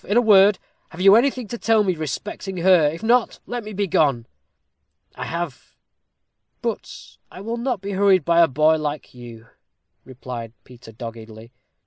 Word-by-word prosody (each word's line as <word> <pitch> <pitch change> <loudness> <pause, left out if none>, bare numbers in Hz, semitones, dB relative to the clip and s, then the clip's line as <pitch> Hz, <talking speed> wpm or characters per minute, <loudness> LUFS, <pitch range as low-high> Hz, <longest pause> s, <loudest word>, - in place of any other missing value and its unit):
In 205 - 0
a - - +6
word, 205 -3 +5 0.3
have 170 - -13
you 195 +1 +6
anything 250 -1 +1
to 235 - -6
tell 225 -2 +2
me 190 -2 0
respecting 180 +5 -6
her? 175 -3 +4
if 165 +7 -5
not, 235 +1 +1
let 245 -1 -5
me 215 - -8
begone." 155 - 0 0.9
"I - - -7
have. 170 -4 -6 0.9
But - - -6
I - - -12
will 230 +3 -4
not 240 -4 -3
be 200 +1 -5
hurried 190 -4 +3
by 170 0 +4
a 165 - +6
boy 155 +3 +2
like 150 -1 -5
you," 120 -2 -12 0.6
replied 120 -3 -8
Peter, 120 -2 -15
doggedly. 115 0 -10
175 Hz, 160 wpm, -21 LUFS, 130-210 Hz, 0.9 s, a